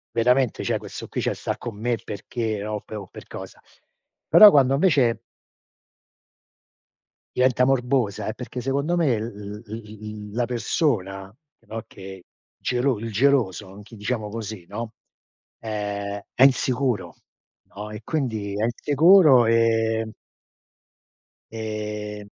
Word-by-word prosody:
veramente, 125 +1 +2
cioè - - 0
questo - - -9
qui - - -3
cioè - - 0
sta - - -4
con 120 -3 -7
me 120 +2 -1
perché, 110 +1 -4
no, 105 0 -3
o - - -3
per 110 - -8
o 100 - -10
per - - -12
cosa?". - - -9 0.7
Però 210 - +10
quando 135 -4 +4
invece 140 -9 +3 2.2
diventa 125 0 +3
morbosa, 125 -5 0
è 110 - -2
perché 125 0 -7
secondo 140 +6 0
me 145 -10 +2
l 110 - -3
l 105 -2 -8
l 105 -1 -8
l - - -12
la 120 +2 0
persona, 110 - -1 0.2
che - - -31
no, 110 0 -6
che 95 -1 -11 0.3
gelo 125 0 0
il 115 +2 -5
geloso, 110 -5 +1
anch'i 105 +3 -13
diciamo 105 0 -3
così, 110 -4 -6
no, 110 +2 -5 0.7
è 100 -2 -4 0.2
è 130 - +4
insicuro, 130 -3 +2 0.6
no? 105 +1 -6
E 105 +1 -8
quindi, 110 -10 -2
è 105 - -1
insicuro 145 +2 +5
e 115 -1 +2 1.4
e 105 -1 -5
115 Hz, 135 wpm, -24 LUFS, 105-125 Hz, 2.2 s, Però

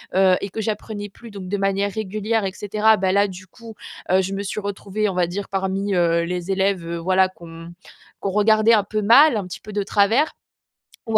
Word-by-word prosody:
heu 190 -1 +5
et 200 - -4
que 220 - -5
j'apprenais 210 -1 -4
plus 230 +3 -14
donc 195 -2 -8
de 205 - -1
manière 195 +1 0
régulière 215 +1 -2
et 190 - -2
cetera, 215 +2 +2
bah, 190 -1 0
là, 200 +1 +3
du 190 -1 -10
coup, 230 +3 -13 0.4
heu, 190 +1 +4
je 190 +1 -4
me 195 +1 -3
suis 200 +1 -4
retrouvée, 205 +1 -3
on - - -3
va 180 -1 +1
dire, 195 +3 -5
parmi, 195 +1 -2
heu, 170 -1 +2
les 180 +2 -3
élèves, 190 -2 0
heu, 170 0 -4
voilà 185 +2 +2
qu'on 165 -2 -12 0.5
qu'on 195 - -2
regardait 215 +2 +4
un 210 -2 +4
peu 215 +2 -3
mal, 250 +7 +6
un 200 - -3
petit 180 - -8
peu 215 - -10
de 205 0 -1
travers. 215 +9 +2 0.7
Ou 225 -1 +3
200 Hz, 220 wpm, -21 LUFS, 185-215 Hz, 0.7 s, mal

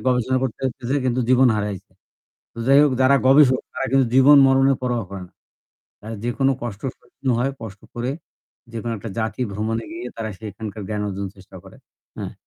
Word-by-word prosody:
গবেষণা 125 +1 +1
করতে 130 -1 -4 0.3
যেয়ে 145 +1 +1
কিন্তু 125 +1 +1
জীবন 130 0 +5
হারাইছে। 105 -3 -4 0.6
তো 115 - -10
যাইহোক 140 +1 +6
যারা 130 +2 +5
গবেষক 135 -2 +6
তারা - - -2
কিন্তু 135 -1 +4
জীবন 140 +2 +8
মরণের 135 0 +3
পরোয়া 120 -2 -1
করে 100 -1 -7
না। - - -32 0.7
এ - - -6 0.2
যেকোনো 135 +3 +1
কষ্ট 110 -4 -5 0.2
সহ্য - - -30
হয়, 135 +3 +1
কষ্ট 105 -3 -9
করে 120 +2 -2 0.6
যেকোনো 115 0 -4
একটা 115 - -7
জাতি 110 +2 -2
ভ্রমণে 110 +2 -2
গিয়ে 170 -6 -6
তারা 115 -1 -4
সেখানকার 105 0 -7
জ্ঞান 105 -1 -2
অর্জন 100 0 -4
চেষ্টা 95 0 -14
করে। 95 - -14 0.4
হ্যাঁ। - - -5
120 Hz, 175 wpm, -22 LUFS, 105-135 Hz, 0.7 s, জীবন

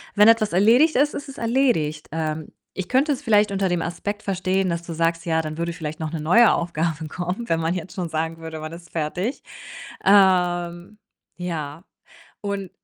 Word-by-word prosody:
Wenn 210 +1 +6
etwas 215 -4 +3
erledigt 235 - +5
ist, 290 +3 +3
ist 285 - -6
es 270 - -10
erledigt. 230 - +1
Ähm, 155 -1 -3 0.3
ich 190 -1 -4
könnte 275 +4 +2
es 270 - -6
vielleicht 210 -3 +3
unter 195 -1 0
dem 175 -1 0
Aspekt 205 +5 -4
verstehen, 190 -1 0
dass 170 0 -2
du 170 - -6
sagst: 165 +1 0
„Ja, 160 -1 +1
dann 155 0 -6
würde 170 0 -2
vielleicht 155 -2 -6
noch 160 0 -3
'ne 160 -2 -4
neue 215 +9 +5
Aufgabe 165 -2 -2
kommen“, 180 +8 -4
wenn 165 0 +2
man 165 +2 0
jetzt 180 0 -6
schon 175 -3 -3
sagen 160 +1 -2
würde, 160 -1 -7
man 155 +1 -7
ist 170 0 -12
fertig. 175 - -2 0.6
Ähm, 180 -1 +3 0.4
ja, 165 -2 -5 0.6
und 200 -2 -3
175 Hz, 185 wpm, -23 LUFS, 165-205 Hz, 0.6 s, Wenn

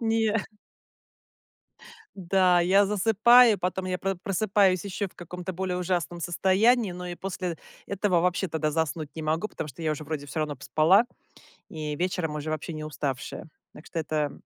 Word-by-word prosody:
Не. 225 -1 +1 1.8
Да, 185 -1 +3
я 195 +3 +4
засыпаю, 225 +3 +5
потом 185 +1 -2
я 185 -1 -2
про 195 0 -1
просыпаюсь 195 -1 +1
ещё 200 +1 -3
в - - -27
каком-то 180 +2 -7
более 185 0 -2
ужасном 175 -1 -2
состоянии. 195 +5 +2
Но 180 0 -7
и 175 - -6
после 180 -3 -4 0.3
этого 195 -3 +1
вообще 180 +2 +1
тогда 155 -1 -1
заснуть 160 -1 -2
не 160 - -4
могу, 160 +7 -1
потому - - -6
что 150 +4 -10
я 160 - 0
уже 155 0 -4
вроде 145 -1 -5
всё 150 - -5
равно 155 -1 -1
поспала, 160 - +4 0.7
и 150 -2 -4
вечером 175 -2 -2
уже 150 +1 -4
вообще 155 +1 -4
не 155 - -6
уставшая. 145 0 -4 0.3
Так 150 - -14
что - - -8
это, 150 -2 -1
180 Hz, 165 wpm, -27 LUFS, 155-195 Hz, 1.8 s, засыпаю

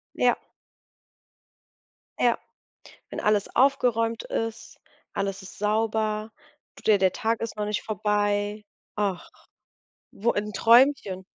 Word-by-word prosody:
Ja. - - +3 1.8
Ja. - - +3 0.7
Wenn - - -5
alles 210 -1 +1
aufgeräumt 235 -4 +2
ist, 225 0 -4 0.4
alles 195 0 -2
ist 190 - -12
sauber. 215 0 0 0.5
Tut - - -14
dir 210 -2 +5
der 190 -1 +3
Tag 230 -2 -1
ist 230 -1 -4
noch 210 - -2
nicht 210 0 -2
vorbei. 205 0 -1 0.3
Ach, 200 -4 -2 0.8
wo 230 +4 0
im 210 0 -3
Träumchen. 230 -5 +4
210 Hz, 110 wpm, -26 LUFS, 205-225 Hz, 1.8 s, dir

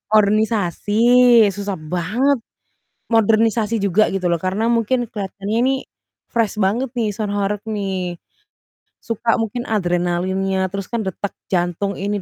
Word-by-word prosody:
ornisasi, 210 -2 +1 0.6
susah 200 -1 -3 0.2
banget, 235 +11 +1 0.8
modernisasi 225 0 +3
juga 200 +1 +2
gitu 190 -2 -1
loh. 170 -2 0
Karena 195 +4 0
mungkin 240 +3 +1
kelihatannya 205 +1 -4
ini 265 - +3 0.6
fresh 225 -2 0
banget 220 +7 +1
nih, 230 -3 +1
sound 210 -2 -2
horeg, 205 0 -1
nih. 190 -5 -3 0.8
Suka 230 0 -1
mungkin 230 +2 -3
adrenalinnya, 190 0 0
terus 195 +1 -5
kan 235 -2 -1
detak 190 +2 -4 0.2
jantung 180 +2 0
ini 200 +1 -2
205 Hz, 125 wpm, -20 LUFS, 190-225 Hz, 0.8 s, modernisasi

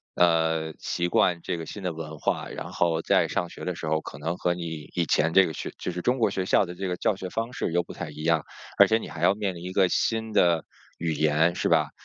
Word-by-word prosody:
呃， 80 -2 +2
习 85 0 -1
惯 85 -1 +2
这 85 - -2
个 80 - -6
新 100 +3 -8
的 90 - -1
文 80 -1 -7
化， - - -1
然 - - -7
后 85 -2 +1
在 - - +3
上 85 - -2
学 - - -9
的 90 - -2
时 80 - -6
候 80 0 +1
可 70 - -9
能 85 +4 -3
和 90 - +1
你 80 -4 -6
以 85 -2 +1
前 80 +2 +2
这 95 -1 +7
个 80 - -3
学 - - -5
就 - - -4
是 90 - -4
中 125 +6 +1
国 115 - +3
学 95 -1 -2
校 95 - +3
的 90 - -8
这 95 +1 -3
个 90 - -1
教 105 - +1
学 95 -2 -5
方 115 +4 -3
式 85 - -3
又 90 0 +2
不 - - -11
太 90 -3 -6
一 75 +1 -8
样， 80 -2 +2 0.3
而 - - +9
且 110 - +3
你 - - -8
还 - - -8
要 - - +5
面 100 -3 -2
临 85 0 -9
一 90 +1 -5
个 95 -2 +4
新 110 -1 0
的 85 -5 +3 0.3
语 80 -1 -1
言 80 +3 +2
是 - - 0
吧？ - - +3
85 Hz, 295 characters per minute, -26 LUFS, 80-90 Hz, 0.3 s, 而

